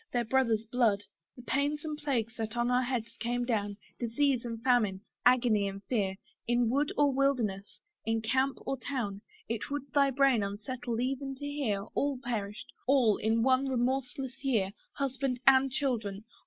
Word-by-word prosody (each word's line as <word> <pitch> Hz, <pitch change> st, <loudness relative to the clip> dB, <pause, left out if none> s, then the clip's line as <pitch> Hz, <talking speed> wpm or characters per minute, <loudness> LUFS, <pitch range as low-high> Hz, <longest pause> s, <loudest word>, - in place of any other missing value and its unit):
their 240 Hz, -1 st, +1 dB
brother's 230 Hz, -3 st, +2 dB
blood. 225 Hz, -3 st, +2 dB, 0.3 s
The 245 Hz, -, -12 dB
pains 290 Hz, +4 st, 0 dB
and 305 Hz, -1 st, -2 dB
plagues 250 Hz, -7 st, -1 dB
that 220 Hz, +1 st, -4 dB
on 240 Hz, +1 st, +1 dB
our 250 Hz, +1 st, +4 dB
heads 245 Hz, -3 st, -3 dB
came 240 Hz, +1 st, -1 dB
down, 205 Hz, -4 st, -1 dB, 0.2 s
Disease 250 Hz, +2 st, +1 dB
and 230 Hz, -2 st, -5 dB
famine, 220 Hz, -7 st, +2 dB, 0.3 s
agony 235 Hz, -5 st, +4 dB
and 195 Hz, 0 st, -6 dB
fear, 200 Hz, -6 st, 0 dB, 0.3 s
In 240 Hz, -1 st, +2 dB
wood 285 Hz, +3 st, +1 dB
or 285 Hz, -2 st, +4 dB
wilderness, 240 Hz, -8 st, 0 dB, 0.2 s
in 225 Hz, 0 st, 0 dB
camp 260 Hz, +4 st, +1 dB
or 270 Hz, -, -1 dB
town, 235 Hz, -7 st, -3 dB, 0.3 s
It 225 Hz, -1 st, -3 dB
would 280 Hz, -1 st, -4 dB
thy 280 Hz, -1 st, +5 dB
brain 270 Hz, -3 st, +3 dB
unsettle 225 Hz, +4 st, -3 dB
even 270 Hz, +2 st, -2 dB
to 285 Hz, -, -7 dB
hear. 270 Hz, -9 st, -1 dB
All 280 Hz, -1 st, 0 dB
perished 225 Hz, -4 st, -4 dB
all, 250 Hz, -6 st, +4 dB
in 225 Hz, +1 st, +1 dB
one 260 Hz, +1 st, +3 dB
remorseless 265 Hz, +1 st, -2 dB
year, 220 Hz, -8 st, +1 dB, 0.2 s
Husband 270 Hz, -2 st, -1 dB
and 270 Hz, 0 st, +6 dB
children! 225 Hz, -7 st, -1 dB
245 Hz, 165 wpm, -31 LUFS, 220-270 Hz, 0.3 s, and